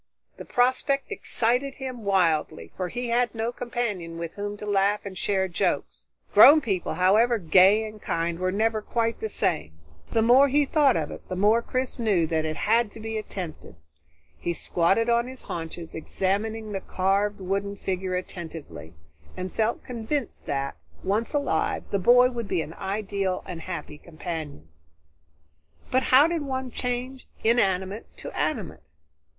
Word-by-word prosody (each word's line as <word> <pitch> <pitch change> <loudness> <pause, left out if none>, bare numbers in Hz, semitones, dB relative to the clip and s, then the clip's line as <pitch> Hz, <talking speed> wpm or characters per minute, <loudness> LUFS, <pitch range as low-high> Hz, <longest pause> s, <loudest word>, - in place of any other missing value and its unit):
The - - -8
prospect 260 +3 +1
excited 250 +4 0
him 255 -3 -6
wildly, 165 - +1
for 185 - -2
he 245 +5 -4
had 240 0 +1
no 225 +1 -1
companion 230 -10 -3
with 170 -1 -5
whom 205 0 -5
to 210 - -7
laugh 205 0 +1
and 195 -2 -6
share 190 +1 0
jokes. 175 - -2 0.3
Grown 300 +2 +9
people, 195 - -2
however 215 +6 +4
gay 195 +4 +5
and 215 -1 -11
kind, 165 0 -2
were 185 0 0
never 220 +2 +1
quite 230 +1 -1
the 220 - -3
same. 75 - -1 0.4
The 225 - +2
more 255 +5 +6
he 290 +2 +3
thought 285 -3 +3
of - - -2
it, - - -10
the 185 - -3
more 210 +5 +4
Chris 255 +1 -3
knew 200 -8 +2
it 160 -1 +1
had 225 +7 +2
to - - -9
be 220 0 -3
attempted. 175 - -7 0.6
He 170 - -2
squatted 185 +9 +1
on 235 0 +2
his 260 0 -9
haunches, 165 0 -6
examining 210 +6 -2
the 195 -1 -3
carved 200 +2 0
wooden 200 +2 -2
figure 185 -1 -3
attentively, 160 - -7 0.4
and 185 0 -5
felt 225 +1 0
convinced 245 +2 -4
that, 140 - -2 0.3
once 215 +4 0
alive, 285 -1 0
the 200 - +1
boy 245 +5 +6
would 235 -3 -4
be 165 - 0
an 155 - -9
ideal 195 -1 -2
and 165 -2 -7
happy 170 -4 -6
companion. 155 - -7 1.2
But 260 - +3
how 265 +3 +8
did 335 -1 0
one 260 -2 -3
change 250 +2 -4 0.2
inanimate 195 -3 +1
to - - -8
animate? - - -2
205 Hz, 155 wpm, -26 LUFS, 180-240 Hz, 1.2 s, Grown